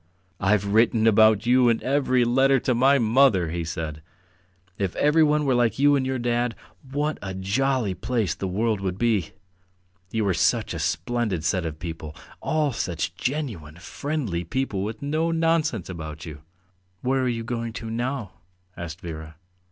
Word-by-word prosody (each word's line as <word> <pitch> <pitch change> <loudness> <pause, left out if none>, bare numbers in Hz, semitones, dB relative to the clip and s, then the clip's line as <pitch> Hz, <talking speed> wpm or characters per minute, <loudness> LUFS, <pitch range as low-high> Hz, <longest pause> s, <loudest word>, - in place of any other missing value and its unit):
"I've 100 0 +2
written 110 +2 +3
about 110 -1 +5
you 125 0 +5
in 115 - +2
every 130 -2 +2
letter 135 +3 +4
to 130 - +1
my 135 +4 +4
mother," 110 - +3
he 85 0 -2
said. 80 -2 -5 0.8
"If 95 -3 -1
everyone 150 0 +3
were 135 - +2
like 120 -3 +2
you 145 +1 +5
and 130 -2 0
your 130 0 -1
dad, 120 -1 0 0.4
what 150 +2 -1
a 95 -1 -5
jolly 110 +3 0
place 115 0 -1
the 95 - -4
world 105 +2 0
would 95 -1 -2
be! 110 -7 +1 0.8
You 110 -2 0
are 95 - +2
such - - +1
a - - -4
splendid 120 -9 -1
set 85 0 0
of 80 -1 -6
people! 80 -2 -7 0.3
All 150 -3 0
such 85 -7 -2
genuine, 120 - -4
friendly 110 - -3
people 105 +1 -2
with 110 +4 -5
no 155 +3 0
nonsense 165 - +1
about 80 -3 -7
you." 75 -3 -9 0.6
"Where 130 +1 +1
are 130 - +1
you 115 -1 -2
going 115 0 -3
to 115 0 -6
now?" 120 -3 -3 0.4
asked 85 +1 -7
Vera. 80 -2 -7
115 Hz, 165 wpm, -24 LUFS, 95-130 Hz, 0.8 s, about